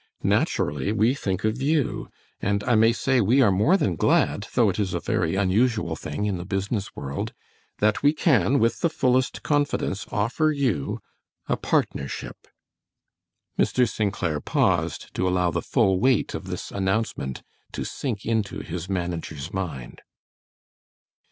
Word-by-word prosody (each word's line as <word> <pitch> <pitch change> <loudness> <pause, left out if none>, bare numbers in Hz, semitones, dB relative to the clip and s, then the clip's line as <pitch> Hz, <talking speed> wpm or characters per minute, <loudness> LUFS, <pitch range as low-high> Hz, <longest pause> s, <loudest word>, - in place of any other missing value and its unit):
Naturally 75 +6 +1
we 110 +3 +3
think 95 -9 -3
of 110 +4 0
you, 145 -1 0 0.3
and 100 +1 0
I 125 - +1
may 115 +1 +5
say 130 +2 +1
we 115 +7 +3
are 105 - +4
more 105 - +4
than 100 - 0
glad, - - +2
though - - +5
it - - -1
is 95 -3 -1
a - - 0
very - - 0
unusual 100 -2 +1
thing 75 +6 -4
in 100 -4 -1
the - - -5
business 100 +2 -3
world, 70 +1 -4 0.4
that 105 +1 +2
we 145 - +5
can, 145 -3 +3
with 115 -2 +2
the 170 - +2
fullest 130 -4 +1
confidence, 145 -9 0
offer 120 +10 +1
you 130 - -1 0.5
a - - +1
partnership." 70 -2 -2 1.1
Mr. 125 -1 +3
St. 105 -1 -1
Clair 85 -6 -2
paused - - 0
to 95 - 0
allow 90 -1 +2
the - - -1
full 95 -7 +2
weight 130 +1 +2
of - - -6
this - - -5
announcement 95 - -2 0.3
to - - -3
sink 115 -8 -4
into 110 -3 -1
his 90 +2 -6
manager's 85 -6 -4
mind. 80 -11 -5
105 Hz, 150 wpm, -25 LUFS, 90-125 Hz, 1.1 s, may